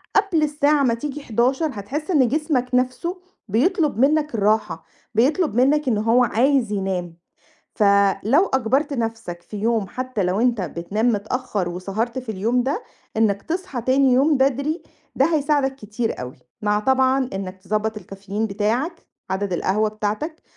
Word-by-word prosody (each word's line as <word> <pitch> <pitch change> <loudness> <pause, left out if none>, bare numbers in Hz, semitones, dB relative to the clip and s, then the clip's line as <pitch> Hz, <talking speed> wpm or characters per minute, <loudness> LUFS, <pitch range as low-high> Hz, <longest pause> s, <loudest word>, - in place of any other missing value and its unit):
قبل 395 -6 +3
الساعة 295 -1 +2
ما 245 -3 +3
تيجي 290 +5 -5
23:00 260 +7 +1
هتحس 270 - -4
إن 275 -7 +4
جسمك 285 -2 0
نَفْسه 255 +9 -1 0.3
بيطلب 290 - +1
منّك 295 0 +2
الراحة، 210 0 0 0.3
بيطلب 280 - +2
منّك 275 +4 +3
إن 225 - +2
هو 230 +4 +3
عايز 245 0 +2
ينام، 185 -4 -3 0.6
فلو 200 - +3
أجبرت 265 +4 +1
نَفْسك 225 -8 -4
في 210 - -9
يوم 220 0 0
حتّى 255 -4 -3
لو 185 +4 0
أنت 240 -2 +2
بتنام 180 +7 -1
متأخّر 210 -2 -2
وسهرت 195 +8 -3
في 255 -2 -8
اليوم 230 +6 +1
ده، 290 - -2 0.3
إنّك 205 -3 +2
تصحى 325 -8 -4
تاني 260 +1 +3
يوم 280 +4 +4
بدري، 280 +5 0 0.3
ده 270 - +4
هيساعدك 285 -2 +1
كتير 220 - -4
أوي، 125 0 -7 0.3
مع 210 0 +1
طبعًا 260 +2 +2
إنّك 190 -1 -5
تضبّط 215 +3 -1
الكافيين 200 +2 -4
بتاعك، 230 - -2 0.2
عدد 190 0 -1
القهوة 205 +5 +1
بتاعتك، 215 +10 -4
240 Hz, 145 wpm, -22 LUFS, 210-280 Hz, 0.6 s, إن